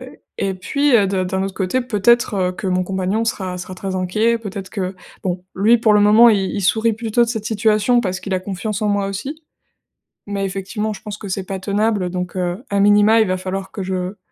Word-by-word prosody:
et -, -, -12 dB, 0.2 s
et 195 Hz, -1 st, -1 dB
puis, 280 Hz, +8 st, +2 dB
heu, 205 Hz, -3 st, +3 dB
d'un 190 Hz, -1 st, 0 dB
d'un 190 Hz, +1 st, -1 dB
autre 195 Hz, 0 st, -3 dB
côté, 195 Hz, +7 st, 0 dB
peut-être, 235 Hz, 0 st, +2 dB
heu, 185 Hz, -2 st, 0 dB
que 185 Hz, -, -6 dB
mon 185 Hz, 0 st, +1 dB
compagnon 190 Hz, +4 st, -1 dB
sera 185 Hz, -5 st, -3 dB
sera 180 Hz, +1 st, -7 dB
très 190 Hz, +1 st, -5 dB
inquiet. 215 Hz, +6 st, +1 dB
Peut-être 200 Hz, -3 st, -7 dB
que 185 Hz, -1 st, -4 dB, 0.3 s
bon, 180 Hz, -1 st, -3 dB
lui 215 Hz, +5 st, +4 dB
pour 225 Hz, -1 st, +3 dB
le 210 Hz, -, +5 dB
moment, 215 Hz, +3 st, +7 dB
i 210 Hz, -, +3 dB, 0.2 s
il 200 Hz, -, -2 dB
sourit 220 Hz, +4 st, +2 dB
plutôt 225 Hz, +1 st, +1 dB
de -, -, -7 dB
cette 220 Hz, -3 st, -3 dB
situation 220 Hz, +2 st, +2 dB
parce 185 Hz, -4 st, -3 dB
qu'il 195 Hz, -, -5 dB
a 185 Hz, -, 0 dB
confiance 200 Hz, +2 st, -4 dB
en 210 Hz, -, +1 dB
moi 205 Hz, -1 st, +1 dB
aussi 270 Hz, +11 st, -6 dB, 0.9 s
mais 200 Hz, -1 st, -2 dB
effectivement, 200 Hz, +3 st, -3 dB
je 205 Hz, -, -10 dB
pense 210 Hz, -1 st, -7 dB
que 205 Hz, -, -8 dB
c'est 190 Hz, 0 st, -3 dB
pas 190 Hz, 0 st, -4 dB
tenable, 205 Hz, -1 st, 0 dB
donc 180 Hz, 0 st, -4 dB
heu, 180 Hz, +4 st, -2 dB
à 200 Hz, 0 st, +1 dB
minima, 205 Hz, +2 st, +5 dB
il 215 Hz, -, +2 dB
va 185 Hz, -, 0 dB
falloir 190 Hz, +1 st, -4 dB
que 200 Hz, -, -5 dB
je 185 Hz, +1 st, -3 dB
200 Hz, 230 wpm, -19 LUFS, 185-220 Hz, 0.9 s, moment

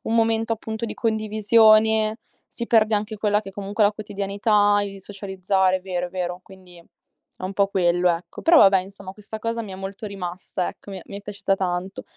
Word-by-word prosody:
momento, 225 Hz, 0 st, +2 dB
appunto, 220 Hz, +1 st, -5 dB
di -, -, -5 dB
condivisione, 220 Hz, 0 st, +3 dB, 0.3 s
si 235 Hz, -, -6 dB
perde 220 Hz, -1 st, +3 dB
anche 210 Hz, +1 st, -3 dB
quella 210 Hz, 0 st, +1 dB
che 195 Hz, -, -9 dB
comunque 200 Hz, +2 st, -2 dB
è 205 Hz, -, +7 dB
la -, -, -1 dB
quotidianità, 205 Hz, 0 st, +1 dB
il 195 Hz, -1 st, -7 dB
socializzare, 190 Hz, -1 st, 0 dB
è 185 Hz, -, -15 dB
vero, 180 Hz, -1 st, -3 dB
è -, -, -15 dB
vero. 180 Hz, -1 st, -4 dB
Quindi 185 Hz, -2 st, -15 dB
è 170 Hz, +2 st, -20 dB
un 185 Hz, +1 st, -4 dB
po' 200 Hz, 0 st, +2 dB
quello, 175 Hz, -2 st, +2 dB
ecco. 170 Hz, 0 st, -4 dB
Però, 330 Hz, 0 st, +6 dB
vabbè, 195 Hz, -6 st, +7 dB
insomma, 195 Hz, 0 st, -10 dB
questa 210 Hz, +2 st, -9 dB
cosa 230 Hz, +1 st, -2 dB
mi 205 Hz, -, -9 dB
è -, -, -6 dB
molto 195 Hz, +3 st, -7 dB
rimasta, 185 Hz, -2 st, -4 dB
ecco, 200 Hz, -, -10 dB
mi 195 Hz, -, -6 dB
è -, -, -13 dB
mi 200 Hz, -, -8 dB
è -, -, -10 dB
piaciuta 200 Hz, -1 st, -1 dB
tanto. 185 Hz, 0 st, -3 dB
200 Hz, 200 wpm, -23 LUFS, 190-215 Hz, 0.3 s, è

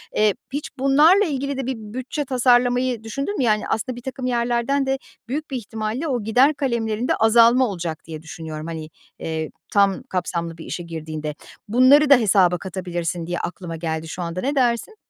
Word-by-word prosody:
Eee, 210 Hz, -1 st, +4 dB, 0.2 s
hiç 290 Hz, +1 st, -3 dB
bunlarla 300 Hz, +9 st, +5 dB
ilgili 280 Hz, -3 st, -2 dB
de 270 Hz, -, -3 dB
bir 260 Hz, +1 st, -2 dB
bütçe 255 Hz, +7 st, -5 dB
tasarlamayı 250 Hz, -1 st, +2 dB
düşündün 275 Hz, -, -3 dB
mü -, -, +1 dB
yani? 215 Hz, -3 st, +1 dB
Aslında 255 Hz, +3 st, -2 dB
birtakım 255 Hz, +1 st, -6 dB
yerlerden 240 Hz, +3 st, +1 dB
de 270 Hz, 0 st, 0 dB, 0.3 s
büyük 295 Hz, +4 st, -4 dB
bir 265 Hz, -, -1 dB
ihtimalle 225 Hz, +5 st, -4 dB
o 245 Hz, -7 st, -1 dB
gider 250 Hz, +7 st, +4 dB
kalemlerinde 235 Hz, -5 st, -1 dB
azalma 235 Hz, +3 st, +5 dB
olacak 170 Hz, -6 st, -5 dB
diye 160 Hz, -2 st, -8 dB
düşünüyorum, 160 Hz, -1 st, -7 dB
hani, 160 Hz, -2 st, -6 dB, 0.3 s
eee, 160 Hz, -1 st, -3 dB, 0.2 s
tam 200 Hz, +3 st, +3 dB
kapsamlı 170 Hz, -6 st, -3 dB
bir 160 Hz, -, -9 dB
işe 175 Hz, -, -5 dB
girdiğinde. 155 Hz, -2 st, -5 dB, 0.3 s
Bunları 260 Hz, +6 st, +5 dB
da 280 Hz, -, +9 dB
hesaba 190 Hz, -6 st, +3 dB
katabilirsin 175 Hz, -2 st, -4 dB
diye 175 Hz, 0 st, -2 dB
aklıma 175 Hz, -2 st, -5 dB
geldi 160 Hz, -1 st, -3 dB
şu 175 Hz, -, -6 dB
anda, 170 Hz, +1 st, -3 dB
ne 280 Hz, +3 st, -1 dB
dersin? 245 Hz, -, +1 dB
225 Hz, 170 wpm, -22 LUFS, 175-260 Hz, 0.3 s, da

